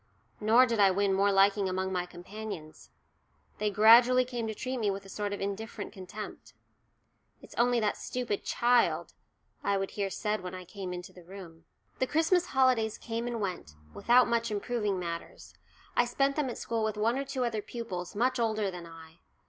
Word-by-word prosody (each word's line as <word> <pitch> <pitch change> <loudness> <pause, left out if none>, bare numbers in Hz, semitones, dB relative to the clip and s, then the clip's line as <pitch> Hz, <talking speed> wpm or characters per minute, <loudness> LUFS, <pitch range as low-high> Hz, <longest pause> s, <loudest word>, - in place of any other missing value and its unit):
Nor 225 +4 +6
did 230 -3 -1
I 200 -1 +7
win 195 +1 +1
more 200 +1 +3
liking 195 0 +4
among 190 +1 -2
my 180 -1 -1
companions. 180 -2 -9 0.7
They 210 - +1
gradually 235 +5 +6
came 240 -2 -4
to 220 - -4
treat 255 +3 -3
me 210 -3 +1
with 195 0 -4
a - - -12
sort 205 +1 -3
of 205 - -4
indifferent 200 +3 -5
contempt. 205 +2 -9 0.8
"It's - - -14
only 245 0 +2
that 210 - 0
stupid 245 -5 -3
child," 240 0 +2 0.5
I 200 0 +1
would 195 0 -3
hear 200 -2 -2
said 210 +2 -2
when 185 0 -6
I 185 -1 -8
came 190 0 -7
into 180 0 -7
the 180 - -14
room. 170 -3 -12 0.3
The 260 - +1
Christmas 330 +4 +2
holidays 255 -5 +2
came 230 +1 -4
and 240 -1 -3
went, 180 - -4 0.2
without 245 +1 +4
much 235 0 0
improving 210 -1 -1
matters. 170 -2 -6 0.4
I 245 - +4
spent 275 +3 +1
them 295 -4 0
at 240 - -5
school 230 -1 -2
with 215 -1 -1
one 225 +3 +2
or - - -1
two 260 -2 -2
other 225 -3 -2
pupils, 200 -7 -6
much 250 +4 +1
older 215 -3 0
than 175 -2 -8
I. 165 0 -14
210 Hz, 190 wpm, -30 LUFS, 190-235 Hz, 0.8 s, I